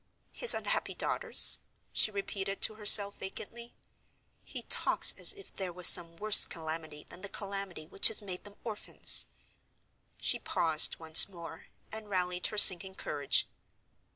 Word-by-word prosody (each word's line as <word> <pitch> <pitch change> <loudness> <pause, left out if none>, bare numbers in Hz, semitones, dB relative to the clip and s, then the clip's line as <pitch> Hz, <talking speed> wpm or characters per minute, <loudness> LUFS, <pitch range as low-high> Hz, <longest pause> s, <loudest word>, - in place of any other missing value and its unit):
"His 485 - +2
unhappy - - -6
daughters?" - - 0 0.3
she - - -1
repeated 195 -1 -8
to - - 0
herself, 205 -1 +5
vacantly. 235 +5 -12 0.7
"He - - -11
talks - - +2
as - - +3
if 400 -1 -10
there 190 -2 -8
was 180 +1 -1
some 170 -1 +4
worse 215 +1 +4
calamity 160 -2 -10
than 180 - -17
the 200 - -10
calamity 195 -5 -9
which 175 - +2
has 220 - -2
made 185 -3 -11
them 205 0 -17
orphans." 220 -3 +1 0.9
She - - -3
paused 160 -2 0
once 160 +3 +2
more; 170 -3 -15 0.2
and 220 -1 -12
rallied 180 -2 -5
her 210 - -10
sinking 190 -1 +4
courage. 145 -5 -4
190 Hz, 145 wpm, -27 LUFS, 170-205 Hz, 0.9 s, herself